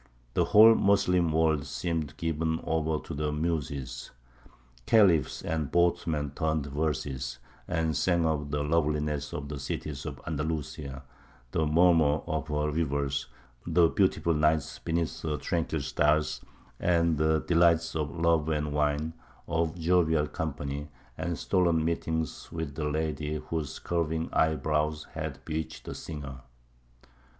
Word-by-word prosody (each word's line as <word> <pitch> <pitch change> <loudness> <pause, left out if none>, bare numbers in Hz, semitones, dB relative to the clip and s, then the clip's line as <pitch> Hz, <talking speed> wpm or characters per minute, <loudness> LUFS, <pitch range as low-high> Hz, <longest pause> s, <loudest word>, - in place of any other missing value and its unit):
The - - +2
whole 110 +2 +8
Moslem 90 -5 +3
world 80 -2 +2
seemed 80 -4 -3
given 80 0 -1
over 80 -1 0
to - - -6
the 75 +1 -1
Muses; 70 -5 -3 0.8
Khalifs 90 - +4
and 80 -3 -2
boatmen 80 -4 +1
turned 80 0 -1
verses, 70 -3 -2 0.3
and 80 -3 0
sang 85 +3 +2
of 75 -2 0
the 75 0 -1
loveliness 75 -2 0
of 70 -1 -5
the 75 -1 -5
cities 70 0 -4
of - - -6
Andalusia, 75 -3 -4 0.5
the 80 - +1
murmur 80 -2 +4
of 80 -3 -2
her 75 0 0
rivers, 70 -3 -1 0.4
the 85 0 +4
beautiful 95 -3 +2
nights 75 -1 +1
beneath 80 -3 -2
her 75 -2 -2
tranquil 80 0 -1
stars, 75 +3 +1 0.4
and 85 -3 +2
the 80 0 +3
delights 85 -1 +3
of 75 -2 -1
love 80 0 +1
and 75 -1 -1
wine, 75 +2 0 0.3
of 80 +1 -1
jovial 80 -2 +3
company 75 -1 -4 0.3
and 85 -1 -3
stolen 85 0 +2
meetings 80 -1 -2
with 80 -4 -4
the 75 +1 -3
lady 75 0 -2
whose 75 -1 -4
curving 80 -1 -2
eyebrows 75 -1 +1
had - - -5
bewitched 80 0 -4
the - - -5
singer. 70 -4 -7
80 Hz, 130 wpm, -29 LUFS, 75-80 Hz, 0.8 s, whole